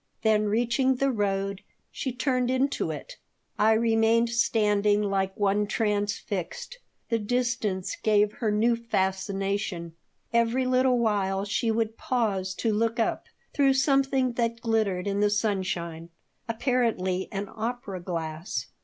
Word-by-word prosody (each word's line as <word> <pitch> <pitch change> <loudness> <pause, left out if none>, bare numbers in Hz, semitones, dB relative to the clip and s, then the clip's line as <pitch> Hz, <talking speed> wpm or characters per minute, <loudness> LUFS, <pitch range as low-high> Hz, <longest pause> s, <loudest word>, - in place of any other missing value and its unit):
Then, 215 -1 +3
reaching 240 +5 +2
the 275 +2 +1
road, 195 -3 -1 0.3
she 265 - -3
turned 255 0 0
into 260 +2 0
it. - - -7 0.4
I 220 +1 +5
remained 225 +1 +3
standing 210 -3 +2
like 195 -1 -1
one 205 +1 +2
transfixed. 210 - -2 0.3
The 230 -1 +1
distance 220 -4 -1
gave 210 -1 +3
her 230 -6 -2
new 225 +3 +3
fascination. 195 -4 -2 0.4
Every 235 +2 +2
little 255 0 +3
while 200 -4 0
she 215 +3 0
would 225 0 -1
pause 195 -7 -1
to 220 +3 0
look 230 +2 0
up 225 - 0 0.3
through 275 -2 +4
something 270 -1 +2
that 230 -1 -1
glittered 220 -6 0
in 200 0 -1
the 210 0 +3
sunshine, 185 -6 -2 0.4
apparently 225 -6 0
an 200 0 -3
opera 225 -4 -4
glass. 160 -6 -4
215 Hz, 125 wpm, -27 LUFS, 195-235 Hz, 0.4 s, I